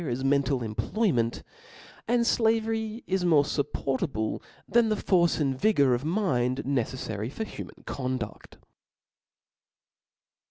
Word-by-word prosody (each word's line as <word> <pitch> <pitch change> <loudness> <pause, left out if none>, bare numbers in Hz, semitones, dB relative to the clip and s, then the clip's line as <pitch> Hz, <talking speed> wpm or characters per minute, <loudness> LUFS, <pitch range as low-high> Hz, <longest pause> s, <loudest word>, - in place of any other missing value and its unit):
as 125 +2 -2
mental 135 -2 +2
employment; 120 - 0 0.6
and 235 +1 +2
flavery 225 0 +1
is 190 -1 0
more 160 -5 +5
fupportable 135 -4 -2 0.3
than 235 -1 +3
the 215 - +2
force 175 -5 +2
and 135 -3 0
vigor 145 -12 +4
of 120 +2 -1
mind 140 - 0
neceflary 125 -4 -2
for 220 - -4
human - - -9
conduct. 130 -5 -5
140 Hz, 110 wpm, -27 LUFS, 125-215 Hz, 0.6 s, more